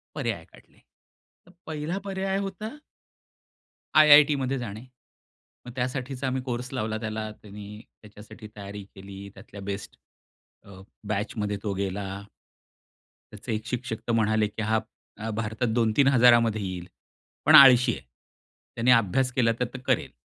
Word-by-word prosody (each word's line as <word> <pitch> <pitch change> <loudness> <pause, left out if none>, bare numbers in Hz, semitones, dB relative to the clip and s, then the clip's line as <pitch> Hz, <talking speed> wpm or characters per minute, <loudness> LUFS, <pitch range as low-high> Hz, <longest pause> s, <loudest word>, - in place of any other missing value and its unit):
पर्याय - - -3
काढले. - - -21 0.7
तर 180 - -19 0.2
1ला 155 +3 -3
पर्याय 195 0 -2
होता 200 +2 -5 1.3
आयआयटीमध्ये 145 -3 +6
जाणे. 110 0 -7 0.8
मग 125 - -8
त्यासाठीचा 130 +1 -3
आम्ही 130 0 -1
कोर्स 125 0 -5
लावला 110 -3 -2
त्याला, 110 -1 -4
त्यांनी 105 0 -10 0.2
त्याच्यासाठी 105 +1 -13
तयारी 100 0 -8
केली, 100 +1 -10
त्यातल्या 100 0 -12
बेस्ट 100 0 -6 0.7
अ, 95 -1 -13 0.3
बॅचमध्ये 105 0 -2
तो 100 -2 -2
गेला. 100 0 -4 1.1
त्याचे 110 +2 -6
एक 110 +1 -4
शिक्षक 125 -3 -4
तर 120 - +1
म्हणाले 110 -1 +2
की 110 +1 -7
हां 110 +1 +1 0.4
अ, 110 +1 -5
भारतात 110 +2 -2
2000-3000 120 -2 +4
येईल. 90 -2 -5 0.6
पण 155 +1 +7
आळशी 125 -3 +8
आहे, - - -8 0.7
त्याने 120 +2 +3
अभ्यास 125 +3 +3
केला 115 -3 +3
तर 125 - +1
तो - - -5
करेल. - - +1
115 Hz, 130 wpm, -26 LUFS, 105-130 Hz, 1.3 s, आळशी